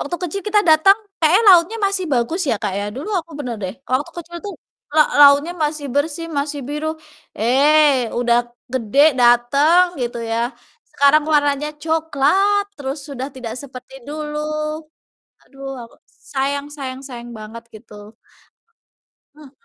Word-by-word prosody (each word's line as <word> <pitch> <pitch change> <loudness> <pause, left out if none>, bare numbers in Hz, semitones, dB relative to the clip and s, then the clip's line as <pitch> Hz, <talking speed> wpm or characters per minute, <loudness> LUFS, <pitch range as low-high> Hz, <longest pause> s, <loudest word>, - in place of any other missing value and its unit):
waktu 320 +5 -3
kecil 395 +3 -4
kita 415 0 +3
datang 320 +6 +6 0.2
kayaknya 330 +7 +4
lautnya 360 +4 +6
masih 390 -1 -1
bagus 255 +9 0
ya - - +2
Kak 205 - -2
ya. 205 - -3
Dulu 290 +9 -6
aku 330 - -21
bener 250 -5 -4
deh 185 - -5 0.2
waktu 290 +6 0
kecil 345 0 -8
tuh 405 - -5 0.4
la - - +7 0.2
lautnya 285 +4 +6
masih 300 -1 -3
bersih, 315 +3 -1
masih 285 0 -3
biru. 300 +1 -4 0.5
Eh, 270 +1 +3
udah 240 -1 +2 0.4
gede 245 -1 -2 0.2
dateng 275 +9 +4 0.2
gitu 240 0 -3
ya, 225 - 0 0.6
sekarang 285 +2 +4
warnanya 290 0 +1
coklat 320 +6 +1
terus 275 +1 -4
sudah 265 -1 -5
tidak 245 -4 -6
seperti 260 -1 -12
dulu, 300 0 -5 1.1
aduh 275 0 -11 0.2
aku 230 - -16 0.4
sayang 280 +1 -1
sayang 265 -2 -6
sayang 240 -2 -9
banget 220 +2 -10
gitu. 215 0 -15 1.4
Mhm. 295 -3 -15
285 Hz, 140 wpm, -19 LUFS, 255-320 Hz, 1.4 s, la